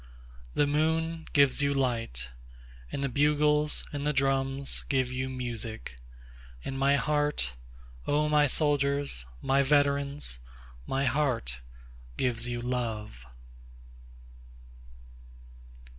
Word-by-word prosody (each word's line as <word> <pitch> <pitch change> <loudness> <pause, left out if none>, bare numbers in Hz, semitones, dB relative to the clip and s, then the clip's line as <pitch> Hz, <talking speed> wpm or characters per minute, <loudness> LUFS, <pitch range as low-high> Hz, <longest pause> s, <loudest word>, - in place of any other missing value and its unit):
9The 145 - +3
moon 160 +2 0
gives 140 -1 +4
you 140 0 +1
light, 115 - -1 0.6
And 140 - -3
the - - +1
bugles 150 +2 +2
and 145 -1 -3
the 150 - +1
drums 135 0 +1
give 130 -2 +1
you 130 +1 -2
music; 120 - -4 0.7
And 135 - -4
my 135 +1 +3
heart, 145 - 0 0.5
O 150 +1 +2
my 150 -1 +4
soldiers, 140 - +1 0.2
my 135 +1 +3
veterans, 140 - +1 0.5
My 135 +1 0
heart 125 - 0 0.6
gives 120 -2 +1
you 120 0 -3
love. 110 - -4
140 Hz, 100 wpm, -29 LUFS, 125-145 Hz, 0.7 s, gives